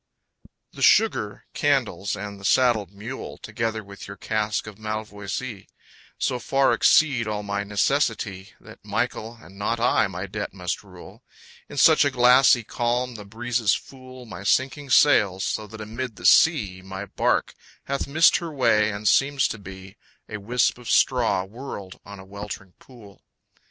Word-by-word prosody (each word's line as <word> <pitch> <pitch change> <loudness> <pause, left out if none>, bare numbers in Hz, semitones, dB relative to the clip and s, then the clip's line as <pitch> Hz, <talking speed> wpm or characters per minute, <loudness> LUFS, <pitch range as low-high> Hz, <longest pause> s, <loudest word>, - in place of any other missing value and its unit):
_ - - -22
The - - -9
sugar, - - +3
candles, 100 +2 0
and 100 0 -7
the - - -14
saddled 110 -4 +2
mule, 110 +6 -8
Together 115 -2 -4
with 100 0 -11
your 100 0 -9
cask 105 +1 -2
of 110 -1 -11
malvoisie, 110 0 -5 0.5
So 125 - -1
far 135 +2 +2
exceed 135 -8 +3
all 105 -1 -3
my 100 0 -2
necessity 105 -2 -1
That - - -15
Michael 115 +2 -3
and 100 -2 -15
not 115 +3 -1
I 120 - +3
my 95 0 -6
debt 100 0 -6
must 90 -2 -3
rule, 90 -3 -14 0.5
In - - -9
such 155 +3 +6
a 140 - +2
glassy 125 -1 +5
calm 120 +3 -2
the 105 -3 -10
breezes 115 +1 0
fool 130 -1 -11
My 100 -5 -9
sinking 135 +7 0
sails, 105 -9 +4
so 110 -1 -3
that 110 +1 -11
amid 115 +2 -5
the 90 - -10
sea 105 - +4
My 95 +1 -7
bark - - 0 0.3
hath 140 0 -3
missed 160 +4 +5
her 170 -2 -6
way, 115 -6 +2
and 105 +1 -4
seems 135 +4 +3
to 110 - -6
be 95 +1 -11 0.3
A 110 - -6
wisp 120 +4 0
of 120 - -9
straw 120 -7 +2
whirled 100 -2 -9
on 100 0 -11
a 95 - -12
weltering 100 -1 -8
pool. 110 -6 -16
110 Hz, 160 wpm, -24 LUFS, 100-125 Hz, 0.5 s, such